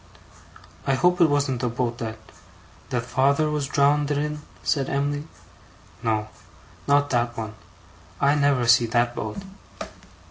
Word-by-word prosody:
'I 135 - +3
hope 180 +5 +2
it 165 - +6
wasn't 140 -3 0
the 125 - 0
boat 120 0 -2
that 110 -1 -4 0.4
' - - -26
'That 120 -1 -2
father 140 +5 +2
was 150 -2 -1
drownded 145 +1 +2
in?' 150 +1 -2 0.2
said 135 -2 0
Em'ly. 145 +2 -1 0.7
'No. 110 -2 -1 0.6
Not 145 0 +3
that 120 -1 0
one, 110 -1 -5 0.7
I 140 +1 +4
never 140 -4 +2
see 115 0 +5
that 120 +1 +1
boat. 110 -3 -5
135 Hz, 140 wpm, -24 LUFS, 120-145 Hz, 0.7 s, it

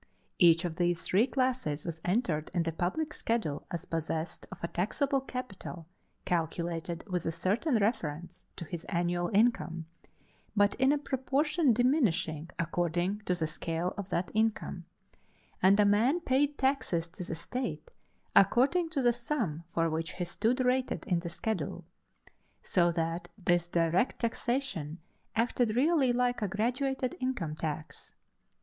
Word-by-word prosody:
Each 170 -1 +6
of 165 -1 -3
these 175 -1 +1
three 210 +7 +3
classes 255 - 0
was 165 -2 -5
entered 175 -6 0
in 170 - +2
the 165 - -1
public 190 - -2
schedule 220 -11 -2
as 170 +1 -4
possessed 160 -1 -3
of - - -7
a - - +1
taxable 270 - 0
capital 250 -10 -6 0.4
calculated 170 0 -2
with 180 -3 -1
a - - +1
certain 205 - 0
reference 175 -7 -2
to 170 - -6
his 170 0 -6
annual 175 -1 0
income, 200 -6 +2 0.7
but 205 -1 +4
in 265 +1 +6
a 295 - +3
proportion 285 +2 +1
diminishing 205 - +1
according 175 +3 0
to 180 - +1
the 165 -2 -1
scale 165 +3 -2
of 200 -2 -5
that 175 +1 -1
income 220 0 0 0.8
and 195 +2 +6
a 210 - +6
man 225 +11 +4
paid 285 -2 +1
taxes 265 -11 +1
to 180 +2 -7
the 170 - -4
state 170 - -4 0.4
according 270 - +4
to 285 -5 -1
the 240 -1 +5
sum 230 - -2
for 165 0 +1
which 165 +2 -2
he 180 - -3
stood 230 +8 0
rated 255 +1 +1
in 180 -6 +1
the 170 0 -5
schedule; 220 +6 -3 0.8
so 175 -2 +3
that 165 +1 -2
this 175 -3 +1
direct 170 +6 +1
taxation 230 - -1 0.4
acted 230 0 +1
really 280 -1 +4
like 245 0 +1
a 210 - +1
graduated 250 +5 -1
income 240 -13 -2
tax. 155 -1 -5
190 Hz, 145 wpm, -31 LUFS, 170-250 Hz, 0.8 s, Each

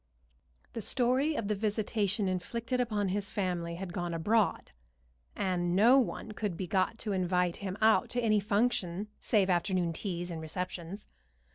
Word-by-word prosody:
The 225 - -4
story 255 +7 +1
of 225 - -2
the 210 - +1
visitation 210 -1 0
inflicted 230 +7 -2
upon 210 -5 0
his 200 +1 -1
family 175 -4 -2
had 180 0 -6
gone 175 -2 -2
abroad, 210 +6 +1 0.6
and 175 -2 0
no 235 +7 +7
one 225 -3 -2
could 205 -4 -3
be 190 - -3
got 190 +4 0
to 220 -2 -3
invite 180 -2 +1
him 195 -1 -5
out 220 0 +4
to 245 - -1
any 215 -3 +3
function 205 -2 0
save 205 -4 +2
afternoon 175 -1 +1
teas 175 -1 -4
and 160 -1 -5
receptions. 180 +3 -5
200 Hz, 155 wpm, -31 LUFS, 180-220 Hz, 0.6 s, no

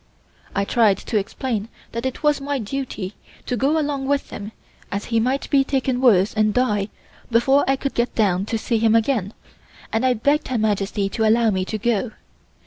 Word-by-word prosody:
I 200 0 +1
tried 215 -4 +3
to 215 +1 -1
explain 220 +1 -3 0.2
that 235 +3 -2
it 260 - -6
was 295 -1 +2
my 285 0 -1
duty 220 -5 -4 0.3
to 250 - -1
go 280 +7 +1
along 285 -3 -1
with 285 0 0
him 205 +1 -7 0.4
as 200 +1 -3
he 225 - +4
might 260 +4 0
be 275 -1 +5
taken 265 -2 -1
worse 205 -6 +4
and 215 -1 +1
die 210 -5 +1 0.4
before 265 +4 +4
I 270 - +3
could 275 0 -3
get 235 +1 -1
down 195 -3 +1
to 225 - -1
see 225 +1 -1
him 225 0 +3
again, 225 -4 +1 0.6
and 225 +2 +1
I 255 -1 +3
begged 285 +7 +1
Her 255 - -1
Majesty 205 -2 0
to 220 +2 +1
allow 225 0 +4
me 185 -1 -1
to 215 - -3
go. 225 +1 0
230 Hz, 195 wpm, -22 LUFS, 210-265 Hz, 0.6 s, be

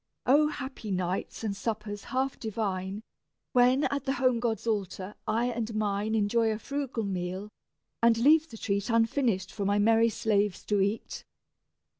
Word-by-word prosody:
O 295 +4 +5
happy 265 -7 -6
nights 185 +3 -2
and 205 -3 -1
suppers 210 -1 -4
half 265 +1 -1
divine, 200 -2 -3 0.5
When, 250 +2 +4
at 280 -2 -1
the 270 - +1
home 255 -2 +2
gods' 230 -2 -1
altar, 200 -3 -2
I 225 +2 +1
and 225 -1 -3
mine 210 +1 0
Enjoy 220 +2 +2
a 215 - -2
frugal 275 -1 -3
meal, 185 +1 -3 0.5
and 230 -1 +5
leave 305 +6 +5
the 225 - -10
treat 200 +1 -1
Unfinished 230 -3 +1
for 205 - -4
my 200 +1 +2
merry 225 +2 +4
slaves 205 -3 0
to 205 -2 +1
eat! 200 +3 -2
220 Hz, 155 wpm, -29 LUFS, 200-245 Hz, 0.5 s, O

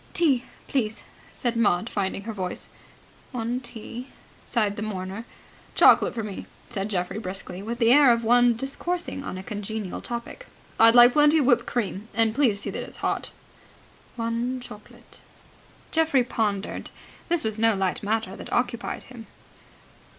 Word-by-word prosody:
"Tea, 275 -7 +2 0.2
please," 220 -5 -1 0.3
said 240 -1 -2
Maud, 210 -3 +2
finding 195 -2 -2
her 225 +1 -5
voice. 185 -3 -4 0.6
"One 245 -1 -2
tea," 240 0 -8 0.4
sighed 210 -4 0
the 205 - -5
mourner. 200 +1 -5 0.5
"Chocolate - - +6
for 225 - -2
me," 205 -2 -6 0.2
said 205 -3 -3
Geoffrey 180 +1 -2
briskly, 185 -2 -6
with 230 +3 -4
the 230 -1 +4
air 285 -3 +7
of 235 0 +1
one 240 +1 +5
discoursing 275 +4 -3
on 185 - -5
a 185 - -7
congenial 210 -1 -5
topic. 240 - -6 0.3
"I'd 230 +1 +7
like 240 0 +9
plenty 295 +1 +5
of 290 - +3
whipped 245 -1 +3
cream. 210 -3 -2
And 225 0 +3
please 235 -6 +2
see - - -3
that - - -4
it's - - -9
hot." - - -1 0.9
"One 235 +2 -2
chocolate." 210 -4 -13 0.7
Geoffrey 320 -5 +3
pondered. 210 -4 -2 0.4
This 345 -2 +1
was 220 -1 0
no 225 -1 +4
light 190 -2 -1
matter 215 -1 -1
that - - -9
occupied 240 -1 -1
him. 240 -3 -12
230 Hz, 155 wpm, -25 LUFS, 205-245 Hz, 0.9 s, like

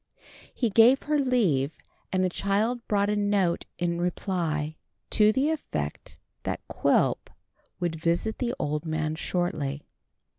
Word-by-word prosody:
He 235 - 0
gave 235 +6 +6
her 300 0 +1
leave, 190 - +1 0.3
and 185 -1 +2
the 185 - +2
child 210 +6 0
brought 205 0 +2
a - - +1
note 205 -4 +1
in 170 0 -1
reply, 165 -4 -1 0.3
to 215 0 +5
the 270 +7 +1
effect 315 -2 -4 0.2
that - - -4
Quilp - - +1 0.5
would 170 -2 -1
visit 170 +7 0
the 245 -1 -1
old 150 +1 -2
man 155 -1 -1
shortly. 155 -4 -2
185 Hz, 135 wpm, -27 LUFS, 160-220 Hz, 0.5 s, gave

